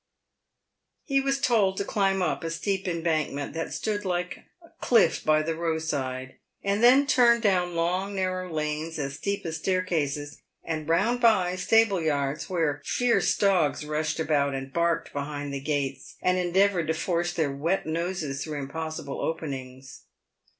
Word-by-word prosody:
He 275 -2 +1
was 275 0 0
told 210 -8 +2
to 200 - -1
climb 195 -2 +1
up 180 - -1
a 165 - -2
steep 190 +3 -2
embankment 160 -4 -1
that 165 0 -4
stood 210 -1 -2
like 180 -2 -3 0.2
a 335 - -17
cliff 220 -9 +3
by 155 0 +3
the 165 +1 -1
roadside, 145 -6 -3 0.2
and 200 +2 0
then 260 +4 +7
turn 240 -4 +5
down 180 -5 +1
long 180 +4 -1
narrow 185 -1 -2
lanes 155 +1 -3
as 140 -1 -4
steep 200 +4 -3
as 160 -1 -3
staircases, 155 -6 -1 0.2
and 155 -1 -4
round 235 +9 +2
by 190 -6 +4
stable 200 0 +3
yards, 145 -2 -1
where 160 -5 0
fierce 245 -1 +2
dogs 175 -8 +2
rushed 155 +1 -2
about 145 -3 +1
and 135 0 -6
barked 170 0 0
behind 145 0 -4
the 140 - -4
gates 140 -2 -3
and 180 0 +1
endeavoured 180 -1 +2
to 160 - 0
force 175 +1 -1
their 160 -5 0
wet 165 +7 0
noses 160 -3 -2
through 155 -2 -5
impossible 145 0 -5
openings. 135 -5 -5
165 Hz, 155 wpm, -26 LUFS, 150-190 Hz, 0.2 s, then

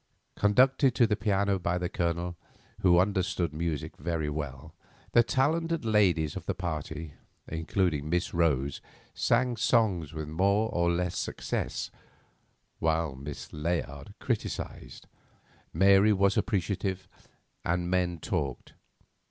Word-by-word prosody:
Conducted 130 +5 +4
to 120 - +5
the 105 -1 +1
piano 100 -2 +1
by 90 0 0
the 90 0 -1
Colonel, 85 +1 -2 0.4
who 90 -2 +5
understood 90 -3 +1
music 80 -2 -3
very 80 -1 -2
well, 75 0 -6 0.4
the 120 - +6
talented 160 +5 0
ladies 90 -9 +2
of - - -7
the - - -1
party, 80 -3 -4 0.3
including 80 -2 -1
Miss 90 +2 0
Rose, 70 -5 +1 0.3
sang 120 0 +1
songs 105 - +2
with 80 -2 -5
more 100 +7 +2
or 85 0 +2
less 85 0 0
success, - - -3 0.9
while 80 -2 +1
Miss 70 +2 -8
Layard 75 -3 -3
criticised, - - -4 0.7
Mary 100 +4 +5
was 100 0 +3
appreciative, 95 -2 -1 0.6
and 90 +1 0
the - - -4
men 90 -1 +1
talked. 75 -6 -3
90 Hz, 120 wpm, -29 LUFS, 80-100 Hz, 0.9 s, the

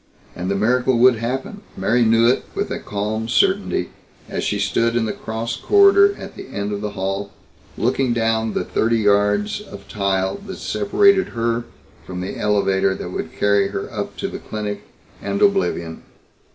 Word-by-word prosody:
And 90 +1 -4
the 100 - 0
miracle 125 +4 +2
would 125 0 +5
happen, 130 - -4 0.2
Mary 115 +6 +2
knew 115 +1 +4
it 125 - +2
with - - -2
a - - -3
calm 105 +2 -3
certainty - - +1 0.4
as - - -3
she 105 - 0
stood 115 +4 +1
in 120 -1 +1
the 110 - -2
cross 115 +1 -4
corridor 400 - +5
at - - -9
the - - -9
end 100 +1 -4
of 100 0 -3
the 105 -1 -4
hall, 95 +1 -2 0.5
looking 130 -2 +1
down 115 -1 0
the - - -1
thirty 115 +1 +1
yards 105 - +2
of 100 - -12
tile 95 - -1
that 190 - -6
separated 400 -1 +3
her 115 +1 0 0.4
from 90 -1 -7
the 90 +1 -4
elevator 95 -2 +1
that - - -6
would - - -4
carry 100 -1 +2
her 100 0 -5
up - - -5
to - - -2
the - - -6
clinic 105 -1 -5 0.4
and 100 0 -2
oblivion. 140 - +1
110 Hz, 175 wpm, -21 LUFS, 100-120 Hz, 0.5 s, would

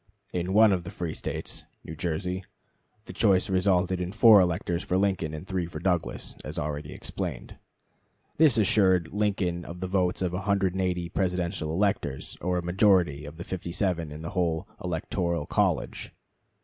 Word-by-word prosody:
In 90 +1 -1
one 110 0 +7
of 90 -2 -1
the 85 - -7
free 85 -3 -4
States - - -5 0.2
(New 80 - -7
Jersey) 90 +4 -2 0.6
the - - -9
choice 95 -3 +3
resulted 95 -1 +2
in 90 0 -3
4 110 -1 +7
electors 90 -1 0
for 90 - 0
Lincoln 95 -5 0
and 80 +3 -7
3 95 -3 -2
for 85 - -8
Douglas, 90 -1 -1
as - - -7
already 75 0 -3
explained. - - -5 0.8
This 150 -7 +5
assured 95 -5 +3
Lincoln 100 -4 0
of 85 +1 -8
the 95 - -3
votes 90 -1 0
of 90 -1 -1
180 95 -2 0
Presidential 90 -4 -1
electors, 95 -7 -1
or 90 0 0
a 90 - -2
majority 90 -5 +3
of 75 +2 -9
57 85 -1 -2
in 75 +2 -8
the 80 - -5
whole 85 -4 -1 0.2
electoral 85 -1 -2
college. - - -1
90 Hz, 155 wpm, -27 LUFS, 85-95 Hz, 0.8 s, one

